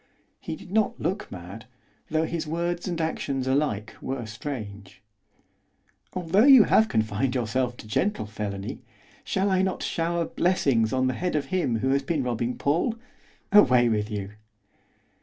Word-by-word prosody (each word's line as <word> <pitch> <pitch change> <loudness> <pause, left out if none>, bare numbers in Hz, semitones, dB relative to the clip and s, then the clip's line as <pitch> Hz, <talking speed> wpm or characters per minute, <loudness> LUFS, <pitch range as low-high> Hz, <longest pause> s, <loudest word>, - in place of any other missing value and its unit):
He 160 - -5
did 175 - -13
not 215 +1 +1
look 195 +3 -3
mad, 100 +4 -9 0.4
though 155 +1 +1
his 165 -1 -3
words 170 +3 -2
and 175 -2 -2
actions 140 -4 -2
alike 130 -6 0
were 130 -3 -4
strange. 105 -5 -7 1.2
'Although 185 +5 +3
you 265 -5 +9
have 220 +1 +4
confined 110 +4 0
yourself 125 +1 -1
to - - -11
gentle 195 - 0
felony, 105 -2 -5 0.4
shall 195 +1 0
I 185 0 +3
not 190 -1 -1
shower 170 0 -1
blessings 140 -12 +1
on 130 -1 +1
the 130 - +1
head 180 +4 -2
of 145 -2 0
him 125 -12 0
who 130 - +1
has 140 +1 +2
been 155 -4 -1
robbing 120 0 -2
Paul? 170 - +1 0.6
Away 125 -12 +6
with 105 -1 0
you! 100 -2 -4
135 Hz, 155 wpm, -26 LUFS, 110-170 Hz, 1.2 s, you